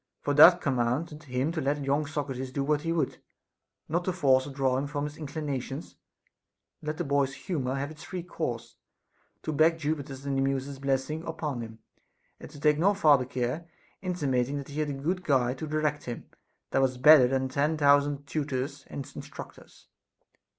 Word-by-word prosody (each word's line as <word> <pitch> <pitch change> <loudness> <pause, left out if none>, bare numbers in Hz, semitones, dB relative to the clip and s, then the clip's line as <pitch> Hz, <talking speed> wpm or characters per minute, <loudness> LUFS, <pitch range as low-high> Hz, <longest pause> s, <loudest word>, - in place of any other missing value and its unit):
For 145 - +1
that 170 +5 +8
commanded 140 +5 -1
him 130 +3 -1
to 165 -2 -2
let 145 +1 0
young 145 +2 +1
Socrates 135 -4 -4
do 135 +1 -1
what 150 +1 +1
he 165 - -2
would, 165 -2 -1 0.7
not 170 +3 0
to 185 - +1
force 135 -6 +3
or - - -6
draw 135 -2 0
him 140 - -3
from 145 0 -3
his 150 0 -4
inclinations, 145 -2 -5 0.9
but 150 - -10
let 155 0 -2
the - - -1
boy's 140 -1 +1
humor 135 -7 -2
have 140 +2 -3
its 155 -1 -12
free 180 +1 -6
course; 125 -9 -5 0.7
to 155 - -2
beg 160 +2 +4
Jupiter's 145 -3 -4
and 140 -1 -1
the 135 - +1
Muses' 135 0 -1
blessing 135 +3 -1
upon 145 -6 -3
him, 110 -1 -8 0.6
and - - -10
take 150 -1 +4
no 200 +4 +4
farther 150 -9 +5
care, 130 +7 -3 0.3
intimating 145 -7 0
that 140 0 -6
he 145 +2 -5
had 150 -1 0
a - - -2
aood 175 +7 -2
guide 130 -4 +1
to 155 - -4
direct 150 -1 -1
him, 120 -1 -6 0.5
that 135 - +2
was 130 -1 +1
better 135 0 +8
than 130 +1 0
ten 150 +4 0
thousand 145 -1 +3
tutors 140 -2 -3
and 140 - -6
instructors. - - -11
145 Hz, 185 wpm, -28 LUFS, 135-155 Hz, 0.9 s, that